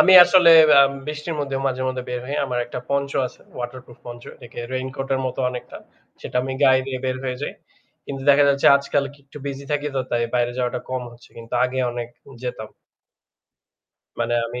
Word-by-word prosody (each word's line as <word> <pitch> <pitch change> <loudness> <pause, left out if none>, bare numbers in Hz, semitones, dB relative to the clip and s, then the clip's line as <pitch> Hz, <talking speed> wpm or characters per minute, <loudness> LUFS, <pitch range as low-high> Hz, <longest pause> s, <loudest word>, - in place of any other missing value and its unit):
আমি 190 - +7
আসলে 180 -2 +6 0.3
আ - - +9 0.2
বৃষ্টির 150 +2 -4
মধ্যেও 140 -1 -3
মাঝে 130 -1 -1
মধ্যে 130 0 -3
বের 125 0 -3
হই। 140 - -3
আমার 125 -1 -2
একটা 120 - -6
পঞ্চ 140 0 0 0.2
আছে। - - -14 0.2
ওয়াটারপ্রুফ 120 0 -7
পঞ্চ, 120 0 -9
এটাকে 120 0 -13
রেইনকোট 130 +1 -4
এর 130 - -1
মত 130 - -5
অনেকটা। 125 -1 -8 0.4
সেটা - - -5
আমি 130 - -4
গায়ে 130 -1 +5
দিয়ে 130 -1 -3
বের 130 0 -1
হয়ে 125 -1 -2
যাই। - - -3 0.5
কিন্তু 135 -1 -6
দেখা 145 +1 +5
যাচ্ছে 140 0 +2
আজকাল 140 0 -1
কি 145 - -20
একটু 140 - -12
busy 140 0 -5
থাকি, 145 0 -1
তো - - +2
তাই 120 -1 +1
বাইরে 120 0 +1
যাওয়াটা 125 -1 -1
কম 130 -1 -2
হচ্ছে। 120 0 -18
কিন্তু 115 0 -8
আগে 125 +1 -2
অনেক 120 -1 -5 0.3
যেতাম। 115 -3 -5 1.5
মানে 120 - 0
আমি 120 +1 -6
130 Hz, 195 wpm, -22 LUFS, 125-140 Hz, 1.5 s, আ